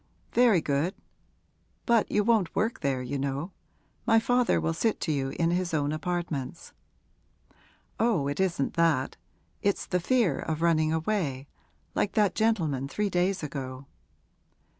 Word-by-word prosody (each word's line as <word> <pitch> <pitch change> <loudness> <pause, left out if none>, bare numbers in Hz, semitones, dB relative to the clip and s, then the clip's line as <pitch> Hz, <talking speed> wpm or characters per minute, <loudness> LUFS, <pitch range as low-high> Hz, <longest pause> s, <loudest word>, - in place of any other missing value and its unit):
'Very 230 -8 +5
good; 145 +6 0 0.9
but 235 -3 +3
you 210 - +2
won't 215 -6 +2
work 220 +3 0
there, 135 -4 -1
you 135 +3 -3
know. 140 +6 -3 0.6
My 225 -1 +6
father 245 +1 +2
will 165 - 0
sit 220 +6 0
to 160 - 0
you 135 -2 -1
in 165 +4 0
his 175 -2 0
own 145 -1 0
apartments.' 155 -3 -4 1.3
'Oh, 220 -11 +2
it 145 +4 -3
isn't 175 -7 0
that; 160 -6 +1 0.4
it's 200 -1 0
the 180 - 0
fear 200 - +2
of 160 0 -3
running 155 -2 +3
away, 160 -6 -1 0.5
like 200 - 0
that 210 -3 +3
gentleman 165 - +1
three 205 +7 -2
days 180 0 +1
ago.' 135 -2 -5
170 Hz, 140 wpm, -28 LUFS, 140-205 Hz, 1.3 s, My